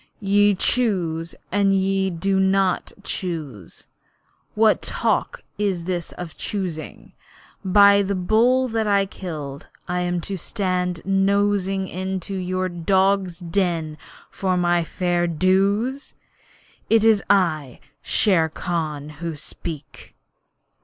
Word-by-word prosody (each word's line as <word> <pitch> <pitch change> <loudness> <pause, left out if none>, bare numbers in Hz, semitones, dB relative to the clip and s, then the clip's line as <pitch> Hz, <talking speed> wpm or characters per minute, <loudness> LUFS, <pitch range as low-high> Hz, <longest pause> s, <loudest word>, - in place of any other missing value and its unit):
'Ye 205 0 +3
choose 180 -8 0 0.2
and 195 0 +3
ye 195 0 +1
do 190 +3 0
not 190 -1 +1
choose! 155 - -5 0.7
What 220 0 +4
talk - - -1 0.2
is 195 -5 0
this 175 -1 -3
of 175 -3 -8
choosing? 180 -6 -5 0.5
By 200 +1 +6
the 200 0 -1
bull 235 +8 +3
that 220 -1 -1
I 200 -1 +3
killed, 155 -7 -7 0.2
am 180 0 -1
I - - 0
to 195 +3 -5
stand 180 -3 -2
nosing 195 0 +1
into 190 +1 -4
your 185 0 -2
dog's 190 +1 +1
den 170 -3 -1 0.4
for 185 -2 -1
my 175 -1 +2
fair 175 +1 -1
dues? 195 - +1 0.7
It 225 -1 +4
is 220 -2 +5
I, 160 -9 +1 0.2
Shere 175 -7 +2
Khan, 155 -3 -3
who 165 -2 -3
speak!' 150 -1 -8
185 Hz, 110 wpm, -22 LUFS, 170-200 Hz, 0.7 s, By